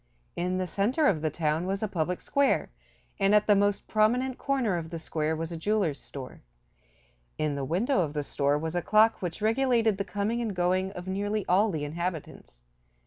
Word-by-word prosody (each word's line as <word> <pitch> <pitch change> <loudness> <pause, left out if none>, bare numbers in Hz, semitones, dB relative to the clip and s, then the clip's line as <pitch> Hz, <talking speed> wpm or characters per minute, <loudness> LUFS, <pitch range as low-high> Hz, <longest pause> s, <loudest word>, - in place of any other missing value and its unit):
In 180 +1 -1
the 185 - -1
center 225 - +1
of 170 - +3
the 155 - 0
town 155 +2 -1
was 195 +2 -2
a - - +1
public 180 -2 -2
square, 280 -1 +1 0.5
and 195 +1 +4
at 210 - +4
the 205 - +5
most 205 0 +1
prominent 245 +4 +1
corner 260 -8 0
of 165 -2 -4
the 170 - -5
square 160 -1 -2
was 165 +1 -4
a 170 - -4
jeweler's 190 -4 0
store. 135 -2 -9 1.0
In 155 -1 0
the 140 -1 -3
window 200 - +1
of 150 -4 -2
the 150 -1 -2
store 140 +1 0
was 160 +2 -4
a 175 - +1
clock 215 +4 +4
which 180 +3 -4
regulated 225 -2 +2
the - - +1
coming 205 +4 -2
and 220 -4 -3
going 185 +2 +1
of 180 -1 -8
nearly 205 +2 -2
all 200 +5 +4
the 155 -6 -3
inhabitants. 160 - -5
185 Hz, 200 wpm, -28 LUFS, 160-215 Hz, 1.0 s, the